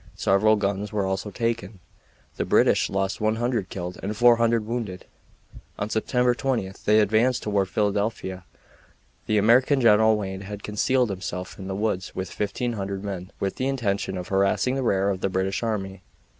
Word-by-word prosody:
Several 105 +3 +3
guns 100 0 -2
were 105 -2 0
also 95 +2 -2
taken. 115 0 -3 0.6
The - - 0
British - - +3
lost 95 +1 -2
100 110 -1 0
killed 90 -1 -6
and 105 +2 -4
400 115 -1 +4
wounded. 110 -5 -4 0.7
On 105 +2 -3
September 125 +2 +2
20 120 -4 -1 0.2
they 105 +1 +5
advanced 110 +4 +2
toward 100 -3 0
Philadelphia. 100 -2 -1 0.8
The 110 - +2
American 125 +6 +4
General 110 -2 +5
Wayne 95 -2 -5
had 100 +1 -8
concealed 120 +3 +1
himself 90 -1 -6
in 95 - -7
the 95 - -3
woods 100 -2 -2
with 95 -1 -4
1500 100 -2 -3
men, 95 -2 -5
with 95 -1 -2
the 130 - -1
intention 100 -8 -1
of 90 - -6
harassing 100 +6 +2
the 135 - -1
rear 100 -5 +1
of 95 -1 -4
the 95 - 0
British 95 +1 -1
army. 95 -4 -3
105 Hz, 160 wpm, -25 LUFS, 95-115 Hz, 0.8 s, they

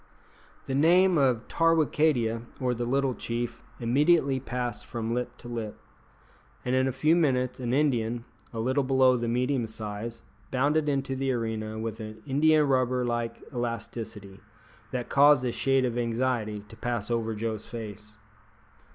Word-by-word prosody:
The 135 - -3
name 175 +6 +5
of 125 -4 +2
Tarwicadia, 155 -8 +2 0.2
or 125 -1 +1
the 120 0 -3
little 135 +1 +1
chief, 120 0 -4 0.2
immediately 135 +3 +3
passed 125 -1 -4
from 115 0 -3
lip 125 0 -3
to 120 - -11
lip, 115 -3 -5 0.9
and 125 - 0
in 130 0 +3
a - - +1
few 155 +6 +3
minutes 130 -7 +1
an 120 -2 -2
Indian, 120 -4 +1 0.3
a 115 - -5
little 130 +5 +1
below 130 -1 +4
the 120 -1 -2
medium 125 +1 0
size, 110 +1 -6 0.3
bounded 145 +3 +1
into 135 -1 -1
the 135 0 0
arena 110 -2 -3
with 110 0 -4
an 110 0 -8
indiarubber 135 -4 +3
like 120 -1 -2
elasticity 115 -4 -5 0.5
that 125 -1 -3
caused 140 -1 +5
a 120 - 0
shade 130 +3 +2
of 120 -1 -1
anxiety 115 -3 -1
to 110 - -13
pass 120 -1 -3
over 115 -1 -1
Joe's 110 0 -3
face. 105 -2 -8
120 Hz, 150 wpm, -28 LUFS, 115-135 Hz, 0.9 s, name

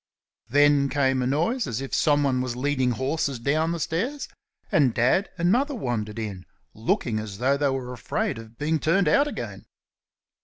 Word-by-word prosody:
Then 145 +1 +4
came 135 -2 +1
a 125 - 0
noise 170 - 0
as 120 -2 -3
if 135 0 -6
someone 145 -5 +2
was 125 -1 -3
leading 130 0 0
horses 135 +2 -1
down 155 +7 0
the 170 - -3
stairs, 230 - -2 0.4
and 135 -6 +3
Dad 130 - +2
and 175 +1 +2
Mother 280 +5 +1
wandered 115 - -3
in, 100 -5 -5 0.3
looking 110 0 -1
as 105 -2 -6
though 130 +5 +2
they 140 0 +1
were 130 -2 -3
afraid 115 -1 -2
of 115 0 -13
being 155 +2 0
turned 175 +6 +2
out 285 +1 +4
again. - - -6
140 Hz, 170 wpm, -25 LUFS, 120-160 Hz, 0.4 s, Then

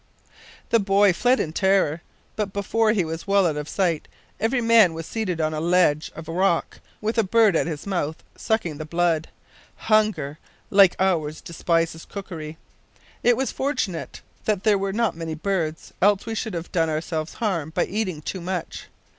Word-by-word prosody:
The 230 - +5
boy 200 -1 +4
fled 250 +8 +2
in 155 - -2
terror, 190 -4 +2 0.3
but 210 -2 -2
before 215 +2 +1
he 200 -6 +1
was 160 +3 -6
well 200 -1 +4
out 160 -3 +1
of 150 0 -5
sight 175 -6 0 0.3
every 230 +4 +1
man 230 -7 +5
was 165 0 -5
seated 190 -6 -3
on 155 0 0
a 155 - -2
ledge 170 -3 +2
of 165 -1 -9
rock 175 +1 0 0.2
with 220 +2 0
a - - +4
bird 215 -1 +4
at - - +1
his 155 -4 -5
mouth, 175 -6 -2
sucking 175 -9 -1
the 155 - -4
blood! 170 0 +1 0.5
Hunger 210 -10 +1 0.3
like 195 -2 +6
ours 165 -5 0
despises 165 -1 -1
cookery! 160 -6 -7 0.6
It 240 -1 +4
was 265 0 -1
fortunate 255 - -3 0.2
that 210 -3 0
there 210 -3 +3
were 195 0 -1
not 220 -2 0
many 165 -1 -4
birds, 160 -2 -2
else 200 +1 +3
we 225 - -3
should 220 -3 -3
have 170 0 -5
done 165 -2 +1
ourselves 155 0 -3
harm 185 -9 -1
by 160 - 0
eating 185 -7 -3
too 185 - -4
much. 180 -1 -5
180 Hz, 175 wpm, -24 LUFS, 160-210 Hz, 0.6 s, like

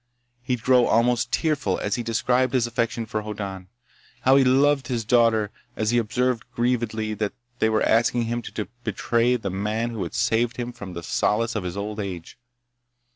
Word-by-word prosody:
He'd 125 -2 -2
grow 125 -2 +5
almost 120 +1 +2
tearful 140 - 0
as 100 - -2
he 120 - 0
described 125 +3 +1
his 125 -2 +3
affection 115 0 -1
for 110 0 -3
Hoddan—how 105 +5 -3
he 135 - +6
loved 135 +1 +3
his 120 -3 -2
daughter—as 115 -1 +1
he 120 - +3
observed 120 +1 0
grievedly 115 -3 0
that 105 -2 -1 0.3
they 110 - +3
were 110 0 +1
asking 120 +1 +3
him 120 +1 -2
to 105 -4 -5 0.2
betray 115 +3 +1
the 105 -6 -3
man 105 +5 -2
who 110 -3 -5
had 85 - -4
saved 115 +2 +1
for 120 -2 -6
him 95 -2 -7
the 85 -1 -6
solace 115 +7 0
of 105 - -2
his 90 +1 -5
old 105 +1 -4
age. 95 +1 -6
115 Hz, 175 wpm, -24 LUFS, 105-125 Hz, 0.3 s, he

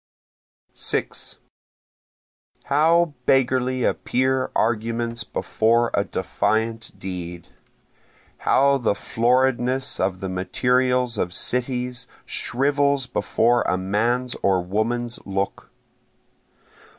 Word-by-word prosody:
6 - - -2 1.3
How 160 +3 +3
beggarly 130 -1 +2
appear 130 +2 0
arguments 115 +1 0
before 115 +1 +1
a - - +2
defiant 110 -1 -2
deed! 90 -3 -7 0.9
How 140 0 +3
the 110 -4 +1
floridness 125 +3 +1
of 95 -1 0
the 95 - -4
materials 125 +5 +1
of 90 -1 -1
cities 125 +1 -2 0.2
shrivels 140 +1 +1
before 120 -1 +1
a 90 - +1
man's 115 +7 0
or 95 -2 +2
woman's 115 +5 -1
look! 100 0 -3
120 Hz, 85 wpm, -23 LUFS, 110-130 Hz, 1.3 s, How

